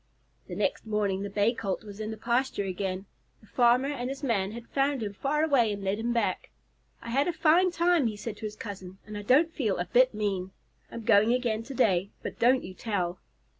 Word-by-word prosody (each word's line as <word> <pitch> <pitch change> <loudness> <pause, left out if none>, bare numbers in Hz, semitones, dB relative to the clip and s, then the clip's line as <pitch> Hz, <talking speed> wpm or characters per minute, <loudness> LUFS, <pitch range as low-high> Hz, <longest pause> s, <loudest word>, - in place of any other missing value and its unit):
The - - -6
next - - -1
morning 205 -3 0
the 200 - -4
Bay 205 +3 +2
Colt 200 -4 -3
was 205 -1 -10
in 215 0 -4
the 220 - -5
pasture 240 0 0
again. 190 0 -3 0.3
The - - -20
farmer 245 +4 +3
and 255 -3 -3
his 275 +2 -6
man 205 -6 0
had 235 0 -8
found 275 -3 0
him 205 -1 -4
far 290 +8 0
away 265 -8 +3
and 200 -1 -5
led 195 +2 -1
him 235 +2 -1
back. 235 -1 -1 0.5
"I 235 - -6
had 275 +5 +2
a - - +2
fine 330 +3 +4
time," 340 -5 +2
he 215 -2 -4
said 210 0 -6
to 220 - -7
his 210 - -9
cousin, 190 -3 -8
"and 210 0 -8
I 205 - -4
don't 295 +10 +3
feel 220 -9 0
a 175 - -1
bit 250 +6 +3
mean. 195 -3 -2 0.4
I'm 230 - -7
going 220 0 +5
again 235 -3 -1
to 270 +4 -8
day, 195 -6 +2
but - - -6
don't 255 +2 +4
you 185 - -8
tell." 185 -4 -2
225 Hz, 225 wpm, -28 LUFS, 200-260 Hz, 0.5 s, going